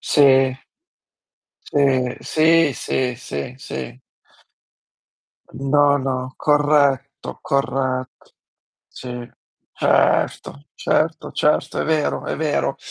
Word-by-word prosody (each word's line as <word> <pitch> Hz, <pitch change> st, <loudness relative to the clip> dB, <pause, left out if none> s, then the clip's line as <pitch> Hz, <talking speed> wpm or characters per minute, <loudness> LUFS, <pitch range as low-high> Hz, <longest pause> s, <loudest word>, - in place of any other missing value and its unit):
Sì. 135 Hz, -3 st, +4 dB, 1.2 s
Si, 130 Hz, -3 st, +2 dB
sì, 160 Hz, -1 st, +3 dB
sì, 125 Hz, -2 st, -2 dB
sì, 120 Hz, -, -6 dB
sì. 125 Hz, -2 st, -7 dB, 1.5 s
No, 145 Hz, +1 st, +2 dB
no, 130 Hz, -1 st, -3 dB
corretto, 145 Hz, -2 st, +1 dB
corretto. 130 Hz, -2 st, -2 dB, 0.6 s
Sì. 125 Hz, -1 st, -8 dB, 0.5 s
Certo, 145 Hz, +2 st, +1 dB
certo, 160 Hz, +1 st, -1 dB
certo, 150 Hz, -, 0 dB
è -, -, -1 dB
vero 155 Hz, -1 st, 0 dB
è -, -, -3 dB
vero. 155 Hz, -2 st, -1 dB
135 Hz, 85 wpm, -20 LUFS, 130-145 Hz, 1.5 s, Sì